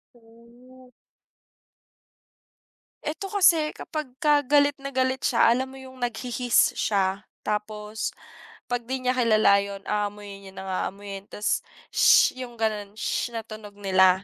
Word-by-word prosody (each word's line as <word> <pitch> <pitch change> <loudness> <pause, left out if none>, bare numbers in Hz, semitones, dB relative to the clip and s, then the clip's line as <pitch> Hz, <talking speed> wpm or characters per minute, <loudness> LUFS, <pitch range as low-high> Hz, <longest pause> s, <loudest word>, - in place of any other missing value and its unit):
Ooh. 240 +2 -19 2.1
Eto 315 +6 -4
kasi 345 -6 +3
kapagka 295 -1 0
galit 285 0 +4
na 275 - -6
galit 260 -1 0
siya, 230 - +4
alam 255 +3 +1
mo 265 - -12
yung 260 -1 -12
nag-hi-hiss 245 0 +1
siya, 195 -2 0 0.2
tapos 210 0 -3 0.6
'pag 240 -1 -2
di 260 - -1
niya 250 - +2
kilala 220 -5 +4
yun 200 0 -5
aamuyin 205 -1 -4
niya 190 - -12
ng 190 +1 -7 0.2
aamuyin, 200 0 -8
ta's, 210 - -1 0.3
sshh. 255 - +5
'Yung 245 -2 -7
ganun, 215 -2 -2
sshh, 235 +2 -2
na 225 - -3
tunog 215 -2 -10
nila. 190 -2 +3
230 Hz, 130 wpm, -25 LUFS, 205-260 Hz, 2.1 s, sshh